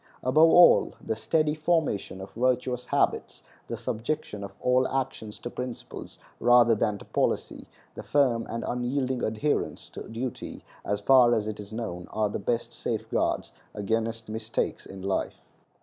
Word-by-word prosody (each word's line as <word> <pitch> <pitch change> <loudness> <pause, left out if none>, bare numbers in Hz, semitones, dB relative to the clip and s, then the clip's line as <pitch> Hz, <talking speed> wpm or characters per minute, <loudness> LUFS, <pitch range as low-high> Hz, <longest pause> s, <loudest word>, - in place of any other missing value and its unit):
Above 155 +6 +5
all, 175 +1 +6
the 110 - -3
steady 155 +6 +1
formation 155 - 0
of 95 - -9
virtuous 125 0 0
habits, - - 0 0.2
the - - -4
subjection 110 -3 -3
of 100 - -6
all 130 +1 +3
actions 125 -5 -3
to - - -7
principles 125 0 -7 0.2
rather 120 -1 +6
than 105 -1 0
to - - -13
policy, - - -1 0.3
the - - -7
firm 130 -5 +2
and 115 +1 -3
unyielding 125 +1 -1
adherence 110 +7 -1
to - - -9
duty, 120 +2 -5 0.2
as 100 0 -2
far 120 +1 +6
as 110 -2 0
it 105 -1 -4
is 105 0 -9
known, 110 -6 -5
are 110 -1 0
the - - -3
best 115 +4 -2
safeguards - - -1 0.2
against 110 +2 -2
mistakes 110 +1 -3
in 95 -1 -9
life. 95 0 -2
115 Hz, 150 wpm, -27 LUFS, 110-130 Hz, 0.3 s, all